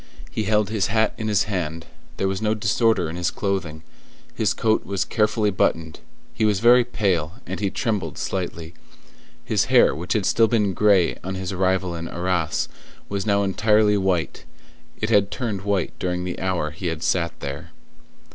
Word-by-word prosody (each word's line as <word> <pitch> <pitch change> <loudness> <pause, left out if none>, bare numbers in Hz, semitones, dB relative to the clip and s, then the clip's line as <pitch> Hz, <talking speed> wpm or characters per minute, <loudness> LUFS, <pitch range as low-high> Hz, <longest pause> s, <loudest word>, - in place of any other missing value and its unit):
He 110 - -2
held 105 0 +1
his 105 -4 +1
hat 110 +2 +1
in 110 - -2
his 105 -2 +2
hand; 85 -5 -3 0.3
there 95 - 0
was 95 +1 -2
no 110 0 +1
disorder 110 -3 +2
in 80 - -6
his 90 -1 0
clothing; 90 -6 -3 0.5
his - - +1
coat 110 -1 +1
was 100 -2 -2
carefully 105 -1 +1
buttoned; 80 -3 0 0.3
he - - -2
was 105 -3 +2
very 120 +3 +6
pale, 95 -9 -1
and - - -5
he 100 -2 0
trembled 95 - -2
slightly; 85 -3 -4 0.7
his - - +1
hair, - - +5
which 85 +5 -3
had 105 -4 0
still 115 +3 +4
been 105 -4 +1
gray 100 -2 +3
on 95 +2 -4
his 95 0 -4
arrival 95 -1 0
in 85 0 -5
Arras, 85 -3 -1 0.4
was 100 +1 -3
now 100 -1 +3
entirely 105 +1 +3
white: 95 -4 -1 0.6
it 105 +2 -1
had 100 -2 +4
turned 110 -7 -3
white 100 -3 -1
during 90 0 -2
the 90 -1 -4
hour 90 -5 -1
he 80 +4 -5
had 80 0 -3
sat 85 -2 0
there. - - -6
95 Hz, 175 wpm, -23 LUFS, 90-105 Hz, 0.7 s, very